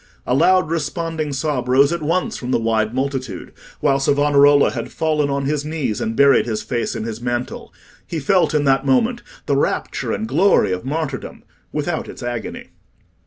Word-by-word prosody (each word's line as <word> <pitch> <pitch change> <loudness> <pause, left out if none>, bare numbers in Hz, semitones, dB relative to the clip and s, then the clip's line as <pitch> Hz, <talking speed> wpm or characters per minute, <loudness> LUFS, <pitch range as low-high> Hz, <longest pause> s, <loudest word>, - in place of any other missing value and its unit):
A 125 - 0
loud 180 +4 +3
responding 160 -1 -2
sob 140 -2 -2
rose 140 +5 +4
at 170 - -3
once 180 +9 -1
from 125 - -6
the - - +2
wide 110 -1 0
multitude, 130 -6 -4 0.3
while 140 -2 +2
Savonarola 145 0 +4
had - - -5
fallen 155 -2 0
on 140 0 -1
his 145 0 -1
knees 150 -9 -3
and 110 - -2
buried 140 -1 +4
his 110 -2 -2
face 120 -2 -2
in - - -3
his 115 0 -5
mantle. 120 0 -4 0.4
He 165 - -3
felt 175 +3 +2
in 150 - +2
that 135 -1 +2
moment 225 - +1 0.2
the 140 - +1
rapture 140 - -1
and 110 - -2
glory 160 - +3
of 90 0 -3
martyrdom 140 0 -4 0.3
without - - -3
its - - -9
agony. 120 -3 -5
140 Hz, 175 wpm, -20 LUFS, 125-155 Hz, 0.4 s, rose